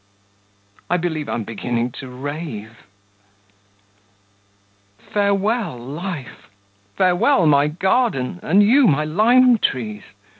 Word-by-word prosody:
I 180 - +2
believe 160 -4 -3
I'm 115 - -2
beginning 120 +3 -3
to 135 - -8
rave. 125 -5 -7 2.1
Farewell, 200 - -1
life! 145 +3 -7 0.5
farewell, 185 +3 +3
my 145 -1 +4
garden! 180 - 0
and 195 +6 +3
you, 250 +5 +5
my 150 -2 +2
lime 235 +8 +4
trees! 105 - -2
160 Hz, 90 wpm, -20 LUFS, 125-200 Hz, 2.1 s, you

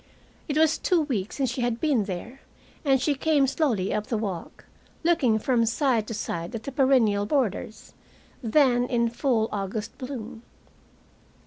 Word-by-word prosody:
It 295 -2 -1
was 315 0 +3
two 355 -3 +2
weeks 225 -10 -2
since 265 -4 0
she 255 - -3
had 240 -1 -1
been 275 -10 +1
there, 210 +8 -7 0.4
and 270 -3 +3
she 290 +3 +1
came 285 0 +2
slowly 260 - 0
up 210 0 -2
the 230 - -1
walk, 195 -6 -5 0.4
looking 280 -10 +3
from 235 +1 +1
side 235 -3 +1
to 225 - -4
side 170 -2 -4
at 225 - -5
the 275 - -5
perennial 250 -7 +3
borders, 220 -5 -2 0.5
then 245 0 +3
in 235 -2 +1
full 235 -2 +1
August 205 +1 -4
bloom. 250 -3 -7
240 Hz, 155 wpm, -26 LUFS, 215-275 Hz, 0.5 s, was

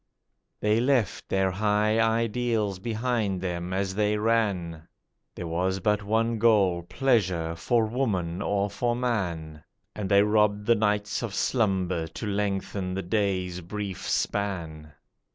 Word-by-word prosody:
They 105 +1 +3
left 125 -4 +1
their 95 -1 +2
high 105 +2 +1
ideals 115 -3 +1
behind 110 -2 -1
them 90 -1 -3
as 95 0 -1
they 105 +1 +1
ran; 100 -8 0 0.5
There - - -5
was 90 +3 -1
but 105 +2 +1
one 115 +2 0
goal, 100 -6 +4
pleasure, 90 -6 0
for 115 +7 +1
Woman 100 -8 -1
or 100 0 0
for 120 +4 -1
Man, 85 -11 -2 0.3
And 100 -3 -4
they 100 0 +6
robbed 105 -1 +2
the 120 - +5
nights 105 -1 0
of 110 -5 -4
slumber 95 -8 0
to 80 +7 -7
lengthen 100 -2 -2
the 95 - -3
days' 90 -2 -1
brief 100 +2 -5
span. 85 -7 -2
100 Hz, 135 wpm, -27 LUFS, 90-110 Hz, 0.5 s, they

